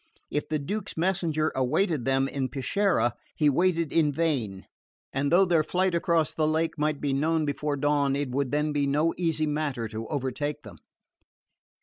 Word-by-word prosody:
If 150 - -2
the 155 - +1
Duke's 200 +10 -4
messenger 165 -3 +1
awaited 135 - +1
them 135 0 +2
at 135 -2 -2
Peschiera 155 -1 +1 0.2
he 150 -2 +3
waited 170 0 +1
in 155 -3 +3
vain; 135 -11 -1 0.5
and 140 +1 0
though 185 +3 +6
their 170 -3 +3
flight 185 +3 0
across 170 -2 +1
the 155 -1 +1
lake 160 +1 0
might 150 -1 -1
be 140 -2 -1
known 155 +3 +1
before 145 0 -2
dawn 145 -1 +1
it 140 -2 -2
would 135 0 0
then 150 +2 0
be 145 -1 +1
no 150 +4 +2
easy 165 -3 0
matter 145 -6 -2
to 110 +1 -6
overtake 145 +1 -3
them. 100 -6 -11
150 Hz, 170 wpm, -27 LUFS, 140-165 Hz, 0.5 s, though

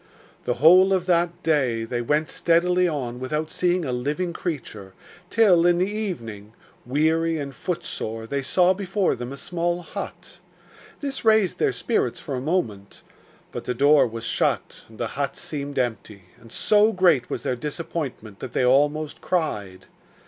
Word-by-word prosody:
The 125 - 0
whole 180 +8 +6
of 185 -2 +1
that 175 0 +1
day 130 -8 +1
they 120 +1 -3
went 150 +6 0
steadily 180 +2 +2
on 125 -7 -3
without 150 +4 -3
seeing 180 -1 0
a 130 - -2
living 150 +8 -2
creature, 115 - -5 0.4
till, 190 -7 +5
in 175 -1 +4
the 185 +3 0
evening, 115 - -5 0.3
weary 160 +4 +1
and 140 -2 -5
footsore, 135 -9 -4
they 140 +4 -2
saw 180 +7 +3
before 195 0 0
them 120 +1 -6
a 140 - -7
small 175 +3 -2
hut. - - -8 0.6
This 275 -2 -3
raised 220 -4 +3
their 435 - +2
spirits - - -1
for 145 - -6
a 125 - -2
moment; 115 - -3 0.5
but - - -6
the 125 - -2
door 145 -1 +5
was 115 0 -7
shut, - - -1
and - - -15
the - - -2
hut - - -3
seemed 145 -1 -5
empty, 110 -5 -3 0.2
and 115 -1 -16
so 210 - +3
great 175 - +3
was 120 - -4
their 125 - -1
disappointment 140 - -5
that - - -7
they 125 - +2
almost 145 +4 +2
cried. 105 - -2
155 Hz, 165 wpm, -24 LUFS, 125-180 Hz, 0.6 s, whole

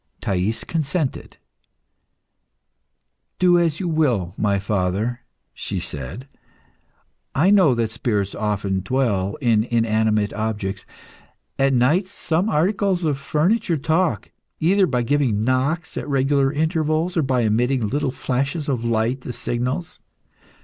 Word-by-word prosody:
Thais 95 +4 -1
consented. 155 -2 -2 2.0
"Do 175 -1 +4
as 165 -3 +1
you 185 - -2
will, 125 - +1
my 100 -2 +1
father," 100 +4 -1 0.3
she - - -4
said. 70 - -7 1.1
"I 175 +8 +4
know 185 -11 +5
that 115 -2 -1
spirits 100 -4 -1
often 105 -2 -1
dwell 100 -2 0
in 115 -4 +3
inanimate 110 -3 +1
objects. 105 -2 -3 0.7
At 135 0 +3
night 150 +11 +3
some 180 +2 -1
articles 190 +2 +1
of 145 -3 0
furniture 165 +5 +1
talk, 160 +4 0 0.3
either 190 +4 +3
by 125 -3 0
giving 120 -5 +1
knocks 130 +7 0
at - - -4
regular 135 0 +2
intervals 160 +2 0
or 165 - +3
by 130 -3 +1
emitting 120 +2 +1
little 140 +4 -1
flashes 140 +4 -2
of 125 -5 -1
light 115 +3 0
as 125 - -4
signals. 125 +8 -3
130 Hz, 120 wpm, -22 LUFS, 110-155 Hz, 2.0 s, know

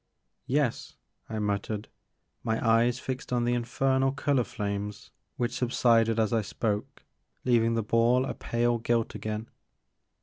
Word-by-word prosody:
Yes," 140 -3 0 0.3
I 110 - -3
muttered, 105 0 -2 0.6
my 110 0 0
eyes 115 +2 +4
fixed 130 -1 -5
on 120 -1 +1
the 120 - +2
in 120 -1 0
fernal 135 +2 +2
color 140 -3 +2
flames 105 -1 -4 0.3
which 120 0 -1
subsided 115 -2 +3
as 110 0 +1
I 115 - +3
spoke, 105 +1 -3 0.4
leaving 115 -2 +3
the 115 - 0
ball 115 +4 +3
a - - -3
pale 120 0 0
gilt 115 0 0
again. 110 +1 -4
115 Hz, 140 wpm, -28 LUFS, 110-125 Hz, 0.6 s, eyes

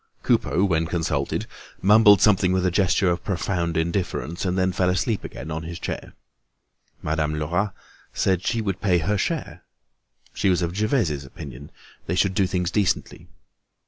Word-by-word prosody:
Coupeau, 90 - +2
when 80 -4 +1
consulted, 80 -5 -1 0.3
mumbled 105 0 +6
something 95 -3 +4
with 95 0 +1
a 90 - +2
gesture 95 +1 +2
of 85 - -3
profound 85 -3 -1
indifference, 85 0 -2
and 90 0 0
then 95 0 +2
fell 90 0 +1
asleep 95 +4 0
again 75 +4 -7
on 80 +1 -3
his 85 +1 -7
chair. - - -6 0.9
Madame 75 0 -1
Lerat 85 +7 -1 0.4
said 95 -2 +1
that - - -7
she 115 -1 +1
would 95 -3 -3
pay 90 -3 +3
her 90 +6 0
share. 100 - -3 0.7
She 100 - +1
was 90 -1 +2
of 85 +1 -3
Gervaise's 105 - 0
opinion, 70 +1 -10 0.4
they 90 - -1
should 95 +1 +2
do 95 0 +2
things 90 -2 -1
decently. 105 -4 -1
90 Hz, 165 wpm, -24 LUFS, 80-95 Hz, 0.9 s, mumbled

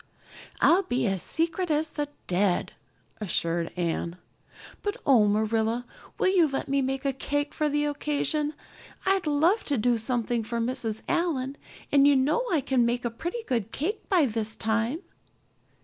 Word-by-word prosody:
"I'll 355 +4 +6
be 255 -12 -1
as 195 -4 0
secret 335 +2 0
as 305 0 +1
the 295 -1 -2 0.2
dead," 185 0 +1 0.4
assured 170 -4 -1
Anne. 170 0 -1 0.7
"But 410 -1 -2
oh, 235 -7 +5
Marilla, 220 +3 +1 0.3
will 375 +1 +2
you 340 -4 +5
let 270 -1 -3
me 275 0 +1
make 270 +1 -2
a 275 - +1
cake 290 +2 -2
for 305 -1 0
the 295 0 +1
occasion? 295 +1 -1 0.5
I'd 385 -3 +2
love 320 +9 +3
to 285 - 0
do 235 +1 +2
something 235 0 -1
for 230 +2 -3
Mrs. 230 -2 -2
Allan, 280 -6 0 0.4
and 280 0 +6
you 285 - +6
know 290 - +2
I 320 -5 +3
can 260 -2 +2
make 240 +1 0
a 235 - 0
pretty 345 - -4
good 230 -5 -1
cake 380 - -3
by 355 -6 +4
this 220 -2 -2
time." 225 +8 0
270 Hz, 165 wpm, -27 LUFS, 225-305 Hz, 0.7 s, I'll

